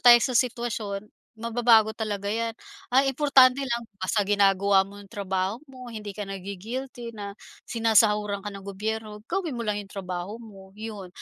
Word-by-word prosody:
tayo 245 -1 +10
sa 255 - 0
sitwasyon, 230 -5 0 0.3
mababago 230 -1 +4
talaga 205 -3 -2
'yan. 230 0 -1 0.4
Ang 265 +2 +6
importante 270 -2 +5
lang 235 -2 -2 0.2
basta 190 +3 +1
ginagawa 200 -1 +4
mo 200 - -12
'yong 195 - -18
trabaho 190 0 -1
mo, 255 -2 -10
hindi 210 -2 -6
ka 210 - -3
nagi-guilty 225 +6 -6
na 200 -1 -5 0.4
sinasahuran 210 -3 +3
ka - - -2
ng 195 -1 -9
gobyerno, 210 +2 -4
gawin 355 -6 -1
mo 235 - -3
lang 205 0 0
'yong 195 - -17
trabaho 185 +2 -4
mo, 195 -4 -13
'yon. 210 -4 -6
215 Hz, 160 wpm, -26 LUFS, 200-235 Hz, 0.4 s, tayo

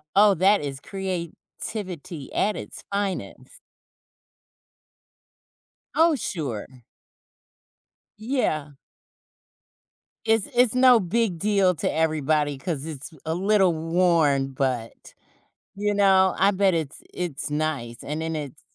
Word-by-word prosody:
Oh, 205 0 +7
that 195 +4 +4
is 140 -2 -5
creativity 180 -3 -6
at 210 +1 +1
its - - -8
finest. 200 - -4 2.3
Oh, 325 0 +4
sure. 140 - -4 1.5
Yeah. 215 - -1 1.5
It's 225 -2 +2
it's 245 -1 +4
no 255 -2 +6
big 190 -1 0
deal 200 -3 +3
to - - -1
everybody 155 -2 +1
'cause 145 0 -4
it's 155 0 -7
a 160 - 0
little 190 -1 +3
worn, 160 -5 +2
but, 130 -4 -3 0.6
you 205 +1 0
know, 190 -2 +4
I 195 +2 +4
bet 195 -1 +2
it's 155 -4 -3
it's 170 -6 -4
nice, 150 -6 -3
and 150 +2 -4
then 160 0 -2
it's 145 -1 -6
175 Hz, 105 wpm, -24 LUFS, 150-200 Hz, 2.3 s, Oh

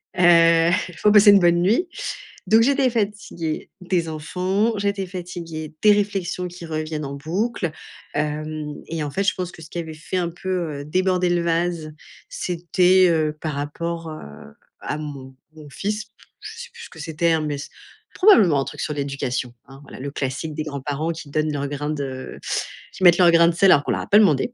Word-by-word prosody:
Heu, 170 -1 +5 0.2
il 180 - -12
faut 210 - +4
passer 210 0 +8
une 200 - +7
bonne 175 -1 +4
nuit. 225 - +2 0.6
Donc 220 +1 +6
j'étais 270 +1 +3
fatiguée 205 -8 -3
des 175 -3 -1
enfants, 185 +8 -1
j'étais 200 -1 -1
fatiguée 170 -4 -7
des 210 -1 +7
réflexions 195 -3 -1
qui 175 -1 -10
reviennent 155 -1 -4
en 140 - -5
boucle, 175 +6 -2 0.4
hem 150 0 -3
et 160 -1 -3
en - - -3
fait 190 +8 -1
je 200 - +2
pense 180 0 -5
que 175 - -13
ce 155 - -12
qui - - -7
avait 160 -2 -4
fait 155 +4 -5
un 175 -1 0
peu, 170 -3 -3
heu, - - -9
déborder 180 +2 +1
le 175 -1 +1
vase, 170 -2 -1 0.3
c'était, 180 +1 +2
heu, 155 -2 0
par 155 -1 -3
rapport, 165 +4 -4
heu, 155 0 -7 0.6
à 150 - -3
mon 140 -3 -8 0.2
mon 155 -2 -13
fils, 210 +9 -3 0.3
je 425 - -8
sais 485 - -9
plus 470 0 -11
ce - - -10
que - - -14
c'était, 160 +2 0
hein, 160 - +3
mais 150 -1 -2
s 140 - -7 0.4
probablement 215 - +5
un 135 - -1
truc - - -7
sur 150 - -2
l'éducation. 135 -3 -3
Hein, 135 +1 -13
voilà, 140 - -12
le 140 +2 -4
classique 145 +3 -4
des 155 - -2
grands-parents 145 +2 -3
qui 160 -3 -8
donnent 155 +1 0
leur 140 -1 -2
grain 145 +1 -3
de 135 -3 -5 0.5
qui - - -7
mettent 175 -1 +7
leur 175 -2 +7
grain 170 0 +6
de 170 - +2
sel 190 +3 +5
alors 145 - +5
qu'on - - 0
leur - - -1
a - - -7
pas 205 - +7
demandé. 200 - +3
170 Hz, 205 wpm, -22 LUFS, 150-185 Hz, 0.6 s, passer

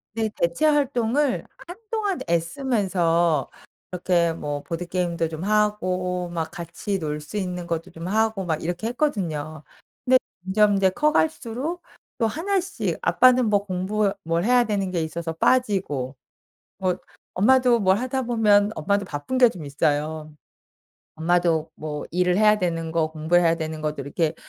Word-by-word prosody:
근데 220 -1 0
대체 170 - 0
활동을 280 -2 +1 0.2
한동안 415 0 -3
애쓰면서 170 - +1 0.4
이렇게 175 -2 +1
뭐 145 -3 -4
보드게임도 170 -1 -2
좀 160 +1 -6
하고 185 -4 0
막 165 -2 -3
같이 180 +3 -4
놀 150 -2 -3
수 155 +8 -7
있는 180 -3 -3
것도 170 +2 -3
좀 165 +1 -7
하고 220 -1 0
막 160 -3 -1
이렇게 175 +6 -3
했거든요. 170 - -2 0.4
근데 255 0 +6 0.3
점점 205 +2 +3
이제 195 -1 +4
커갈수록 300 - 0 0.4
또 230 -3 +2
1 380 - 0
씩 385 +3 -3
아빠는 255 -1 +5
뭐 205 -1 +2
공부 195 +2 0
뭘 165 +1 0
해야 245 +1 +5
되는 200 -4 -1
게 175 -2 -1
있어서 165 +1 -4
빠지고 175 - +1 0.6
뭐 185 -2 0 0.4
엄마도 250 +4 +4
뭘 190 0 +3
하다 255 +1 -2
보면 215 -4 +3
엄마도 200 +5 0
바쁜 155 - -4
게 245 -2 +7
좀 175 -7 -9
있어요. 150 +2 -1 0.8
엄마도 165 -1 +1
뭐 150 -1 -5
일을 180 +1 +1
해야 215 0 +5
되는 165 -3 -2
거 160 -1 +1
공부 160 +2 0
해야 170 -2 +4
되는 160 -1 -5
것들 150 -2 -3
이렇게 160 +2 0
185 Hz, 285 characters per minute, -24 LUFS, 165-225 Hz, 0.8 s, 게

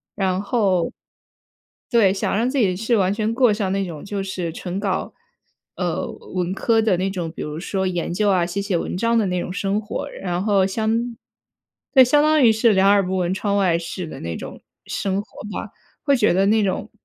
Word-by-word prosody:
然 190 -1 0
后 195 -5 +1 1.0
对， 210 -6 +4
想 195 - -1
让 240 +3 +1
自 280 - -2
己 195 -7 +2
是 225 +4 +1
完 195 -1 +2
全 215 +1 -1
过 245 -3 +4
上 200 -3 -1
那 195 0 0
种 160 -5 -8
就 200 -1 -3
是 185 -3 -4
纯 180 +2 -5
搞， 195 -2 -2 0.6
呃， - - -2 0.3
文 180 0 -1
科 225 +2 +2
的 215 -5 +2
那 190 +2 0
种， 175 -4 -4
比 - - -8
如 150 +1 -5
说 190 0 -2
研 175 -1 -2
究 205 +3 +1
啊、 180 -3 +3
写 180 +3 -3
写 200 -3 0
文 175 - -3
章 230 +3 +2
的 220 - +2
那 180 -1 -1
种 180 - -5
生 200 +2 -1
活。 210 - -5
然 180 0 -3
后 200 -3 +3
相 225 +3 -1 0.8
对， 265 - +9
相 290 +4 +4
当 305 -2 +4
于 225 - +7
是 220 0 +3
两 190 +1 +4
耳 200 0 +5
不 185 +1 -2
闻 180 0 0
窗 200 0 -1
外 180 -4 +3
事 170 +2 -5
的 - - -8
那 85 0 -4
种 - - -9 0.2
生 195 0 -2
活 210 - -12
吧。 215 - -5 0.3
会 280 -2 +3
觉 215 -6 +3
得 190 +2 +3
那 215 +1 +3
种 200 +3 -2
195 Hz, 230 characters per minute, -22 LUFS, 185-220 Hz, 1.0 s, 对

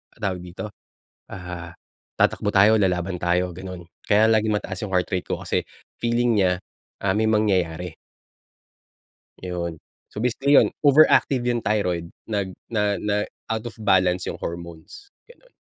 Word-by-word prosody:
tawag 95 -3 -2
dito? 90 +4 -7 0.6
Ah, 85 -2 -7 0.5
tatakbo 105 - +2
tayo, 105 +2 +6
lalaban 90 -3 +1
tayo, 90 0 0
gano'n. 90 -2 -8 0.2
Kaya 105 +2 +4
laging 110 -1 +3
mataas 95 +1 -6
yung 100 - -5
heart 90 -1 +1
rate 95 -3 -2
ko - - -2
kasi - - -1 0.3
feeling 120 0 +1
nya, 90 -1 +2 0.4
ah, 95 -1 0
may 110 +1 +2
mangyayari. 90 -6 0 1.5
'Yon. 85 -2 -4 0.3
So - - -14
basically 135 +4 +1
'yon, - - +5
overactive 140 -3 +5
yung 120 -1 +1
thyroid 90 -6 -1 0.2
nag 100 -4 -2 0.2
na 105 -2 +1
na 105 0 0 0.3
out 110 +1 -2
of - - -16
balance 95 -3 +2
yung - - -4
hormones, 85 - -8 0.2
gano'n. - - -20
95 Hz, 140 wpm, -23 LUFS, 90-110 Hz, 1.5 s, tayo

